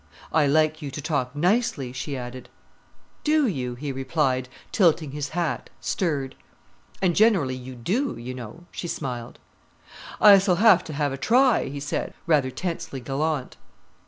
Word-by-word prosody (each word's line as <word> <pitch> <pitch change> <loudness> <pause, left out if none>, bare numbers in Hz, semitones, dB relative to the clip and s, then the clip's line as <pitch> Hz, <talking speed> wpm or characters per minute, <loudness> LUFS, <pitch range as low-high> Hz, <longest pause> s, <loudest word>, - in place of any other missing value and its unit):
"I 155 -2 +4
like 155 +2 +2
you 145 - -4
to 135 - -7
talk 145 -4 -2
nicely," 170 - +1
she 135 +2 -4
added. 125 0 -8 0.7
"Do 305 -1 +3
you," 130 - -2
he 140 +3 -4
replied, 130 -1 0 0.2
tilting 165 -7 +3
his 145 0 -4
hat, 170 -2 -1
stirred. 145 -7 -1 0.7
"And 175 -3 +3
generally 195 - +4
you 130 0 -9
do, 220 - -1
you 120 +2 -6
know," 125 +7 -9
she 175 - -5
smiled. 125 -7 -5 0.8
"I 200 -2 +9
s'll 190 -1 +2
have 195 -2 +6
to 155 - -6
have 145 -1 -1
a - - -4
try," 250 - +3
he 140 +1 -5
said, 145 +1 -3
rather 150 -5 +3
tensely 165 -1 -4
gallant. 140 +2 -2
145 Hz, 155 wpm, -25 LUFS, 130-175 Hz, 0.8 s, I